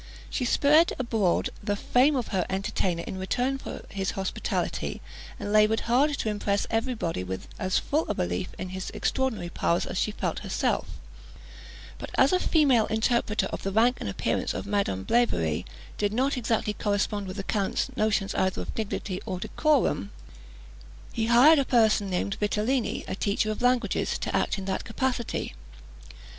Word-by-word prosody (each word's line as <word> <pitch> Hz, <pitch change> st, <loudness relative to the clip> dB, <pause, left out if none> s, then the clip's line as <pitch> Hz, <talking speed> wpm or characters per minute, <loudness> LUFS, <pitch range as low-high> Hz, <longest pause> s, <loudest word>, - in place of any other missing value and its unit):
She 255 Hz, -, -1 dB
spread 300 Hz, +7 st, +4 dB
abroad 225 Hz, -8 st, +1 dB
the 205 Hz, 0 st, -1 dB
fame 255 Hz, +8 st, +3 dB
of 250 Hz, -3 st, -2 dB
her 190 Hz, -3 st, +1 dB
entertainer 190 Hz, -2 st, -1 dB
in 190 Hz, -, -5 dB
return 250 Hz, +8 st, -1 dB
for -, -, -7 dB
his 195 Hz, -1 st, -2 dB
hospitality, 190 Hz, -1 st, -2 dB, 0.4 s
and 205 Hz, -, -3 dB
laboured 215 Hz, +1 st, +4 dB
hard 280 Hz, +5 st, +2 dB
to 220 Hz, -, -1 dB
impress 205 Hz, -1 st, 0 dB
every 235 Hz, +3 st, 0 dB
body 165 Hz, -, -2 dB
with 95 Hz, 0 st, -5 dB
as 185 Hz, +1 st, +1 dB
full 305 Hz, +3 st, 0 dB
a -, -, 0 dB
belief 180 Hz, 0 st, -1 dB
in 185 Hz, -, -5 dB
his 185 Hz, +1 st, -5 dB
extraordinary 255 Hz, -10 st, -1 dB
powers 170 Hz, 0 st, 0 dB
as 185 Hz, -, -3 dB
she -, -, +1 dB
felt 210 Hz, -, -3 dB
herself; -, -, -1 dB, 1.1 s
but -, -, -6 dB
as -, -, +5 dB
a 365 Hz, -, +4 dB
female 275 Hz, -12 st, +3 dB
interpreter 220 Hz, -2 st, +1 dB
of -, -, -4 dB
the 195 Hz, -, -2 dB
rank 235 Hz, +5 st, +3 dB
and -, -, -3 dB
appearance -, -, -1 dB
of -, -, -4 dB
Madame 200 Hz, -, -1 dB
Blavary 85 Hz, -, +1 dB, 0.3 s
did 205 Hz, -1 st, +1 dB
not 265 Hz, +6 st, +1 dB
exactly 225 Hz, -3 st, 0 dB
correspond 205 Hz, -1 st, -1 dB
with 185 Hz, +2 st, -6 dB
the 195 Hz, -, -3 dB
count's 210 Hz, +6 st, -1 dB
notions 215 Hz, -4 st, +1 dB
either 190 Hz, 0 st, 0 dB
of -, -, -7 dB
dignity 195 Hz, -3 st, -3 dB
or 185 Hz, -, -3 dB
decorum, 255 Hz, -, +1 dB, 1.0 s
he 225 Hz, -1 st, -1 dB
hired 265 Hz, +7 st, +7 dB
a -, -, +3 dB
person 220 Hz, -5 st, +3 dB
named 190 Hz, +2 st, -1 dB
Vitellini, 215 Hz, +4 st, 0 dB
a -, -, -3 dB
teacher 205 Hz, +2 st, 0 dB
of 215 Hz, -, -5 dB
languages, 250 Hz, 0 st, +1 dB
to -, -, -3 dB
act -, -, +1 dB
in 195 Hz, -, -5 dB
that 190 Hz, 0 st, -2 dB
capacity. 245 Hz, +1 st, -2 dB
215 Hz, 170 wpm, -27 LUFS, 195-245 Hz, 1.1 s, hired